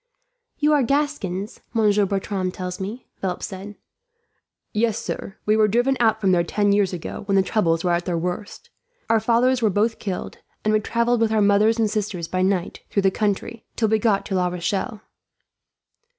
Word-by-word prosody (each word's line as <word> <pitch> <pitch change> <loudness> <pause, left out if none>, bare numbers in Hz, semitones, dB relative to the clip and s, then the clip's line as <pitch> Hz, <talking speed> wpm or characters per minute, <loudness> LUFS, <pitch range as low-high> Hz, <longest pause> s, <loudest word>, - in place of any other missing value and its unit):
"You 300 0 +3
are 290 - +4
Gascons, 235 -8 -1 0.2
Maitre 210 -2 +3
Bertram 195 -1 -2
tells 180 -1 -5
me," 210 +6 -6
Philip 185 -2 -3
said. 195 +2 -7 1.0
"Yes, 220 0 +1
sir. 220 -3 -5
We 215 - +3
were 215 -1 +4
driven 245 +6 +2
out 220 -2 +3
from 195 -3 +2
there 175 -2 +3
ten 205 +3 +1
years 200 -2 +2
ago, 180 -3 -6
when 200 - +2
the 195 - +5
troubles 165 -5 +1
were 180 - +1
at 175 0 0
their 175 -2 -1
worst. 180 +4 -5 0.4
Our 225 - +5
fathers 240 +3 +2
were 220 - +3
both 215 +4 +1
killed, 190 -3 -5 0.3
and 215 - +3
we 215 - +4
travelled 235 +2 +1
with 225 -1 +2
our 220 - +2
mothers 210 +2 +4
and 225 -1 +2
sisters 205 -5 -3
by 185 +2 -1
night, 185 -2 0
through 200 - 0
the 195 - +4
country, 215 +3 -2
till 220 -2 +1
we 220 0 +3
got 205 -2 +1
to - - -4
La 180 -1 +2
Rochelle." 190 +5 -3
205 Hz, 190 wpm, -23 LUFS, 190-225 Hz, 1.0 s, the